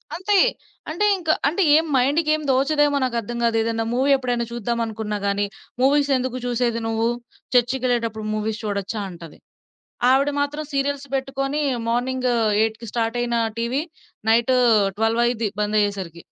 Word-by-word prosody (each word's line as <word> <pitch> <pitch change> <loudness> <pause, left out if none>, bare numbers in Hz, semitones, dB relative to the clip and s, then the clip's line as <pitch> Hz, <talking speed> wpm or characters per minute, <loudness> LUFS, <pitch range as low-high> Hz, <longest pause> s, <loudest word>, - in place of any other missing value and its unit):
అంతే. 395 +2 +1 0.5
అంటే, 345 +7 0
ఇంక 335 -3 -7 0.2
అంటే, 350 +6 +1
ఏం 325 - +1
మైండుకేం 305 +4 +2
దోచదేమో 285 +2 +2
నాకర్థం 235 -2 -2
గాదు. 230 -1 +2
ఏదన్నా 225 0 -1
మూవీ 270 +3 +2
ఎప్పుడైనా 245 -2 -1
చూద్దామనుకున్నా 225 -2 -3
గానీ, 200 +1 +1 0.4
"మూవీసెందుకు 265 -2 +2
చూసేది 240 -1 0
నువ్వు? 225 +1 0 0.5
చర్చికెళ్ళేటప్పుడు 240 -3 +1
మూవీస్ 215 +1 -3
చూడొచ్చా" 205 0 -3
అంటది. 170 -3 -12 0.7
ఆవిడ 275 +2 +3
మాత్రం 295 +2 -2
సీరియల్స్ 280 0 -1
బెట్టుకొనీ 275 +2 -2 0.3
మార్నింగూ 250 +1 0 0.3
8కి 225 +1 -2
స్టార్టయిన 235 +1 -1 0.2
టీవీ 245 +5 -1 0.5
నైట్ 235 +3 +3 0.5
ట్వల్వయిద్ది 230 0 +1
బందయ్యేసరికి. 205 -5 -1
240 Hz, 115 wpm, -22 LUFS, 225-275 Hz, 0.7 s, ఆవిడ